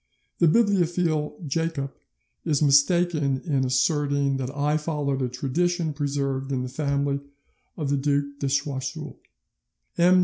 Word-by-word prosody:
The 170 - +5
bibliophile 170 -6 +2
Jacob 150 -2 -2 0.5
is 150 -4 +1
mistaken 145 -1 +3
in 140 -6 +1
asserting 140 +1 +1
that 130 -1 -3
I 145 +2 0
followed 150 -3 -2
a 125 - 0
tradition 160 +6 -1
preserved 140 -2 -2
in 130 -2 -1
the 130 - -4
family 140 0 -1 0.6
of 145 -4 -2
the 140 - +2
Duc 140 +1 +1
de 140 - -1
Choiseul; 140 -1 -3 0.8
M. 180 +2 +6
145 Hz, 130 wpm, -25 LUFS, 135-160 Hz, 0.8 s, M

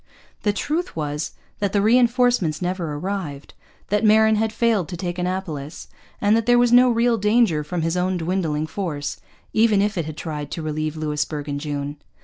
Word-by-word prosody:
The 210 - +2
truth 310 - -2
was 150 0 -3 0.3
that 200 -2 -1
the 205 - +3
reinforcements 240 -7 +3
never 175 -4 -2
arrived, 160 -4 -5 0.4
that 210 +1 +1
Marin 220 0 +5
had 220 +1 0
failed 220 -6 +1
to 175 - -5
take 175 0 -4
Annapolis, 180 -5 -4 0.3
and 205 +1 +3
that 225 0 0
there 245 0 +5
was 240 -1 +4
no 250 +1 +7
real 235 0 +2
danger 210 -7 +3
from 165 +2 -3
his 165 +1 0
own 180 +1 0
dwindling 165 -3 -1
force, 155 -5 -4 0.3
even 220 -2 +4
if 205 -2 0
it 165 - -1
had 155 -1 -7
tried 150 -3 -5
to 165 - -4
relieve 155 0 -3
Louisbourg 150 -1 -2
in 145 -1 -3
June. 145 0 -4
180 Hz, 180 wpm, -22 LUFS, 155-220 Hz, 0.4 s, no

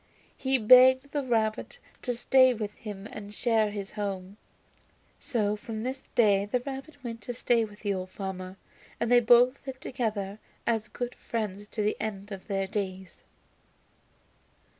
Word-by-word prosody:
He 265 0 +2
begged 260 +4 +7
the 290 - 0
rabbit 225 - -1 0.2
to 245 -2 -2
stay 255 +1 +5
with 210 -2 -4
him 205 -2 -8
and 210 -1 -9
share 225 -3 +2
his 200 -2 -6
home, 200 -2 -4 0.8
so 210 -4 0
from 220 +1 -6
this 260 +2 -5
day 200 -4 +4
the 230 +5 0
rabbit 275 +2 -8
went 230 -2 -6
to 245 - -5
stay 235 -1 +2
with 210 -1 -14
the 205 -2 0
old 185 -1 -4
farmer 190 -1 -6 0.4
and 235 0 0
they 245 - +8
both 245 +2 +5
lived 260 0 -6
together 215 -5 -3 0.3
as 225 -2 0
good 245 +2 -4
friends 205 -3 -4
to 210 0 -3
the 210 - 0
end 205 -1 -5
of 195 -1 -8
their 195 -2 0
days. 190 -2 -5
215 Hz, 160 wpm, -28 LUFS, 200-245 Hz, 0.8 s, they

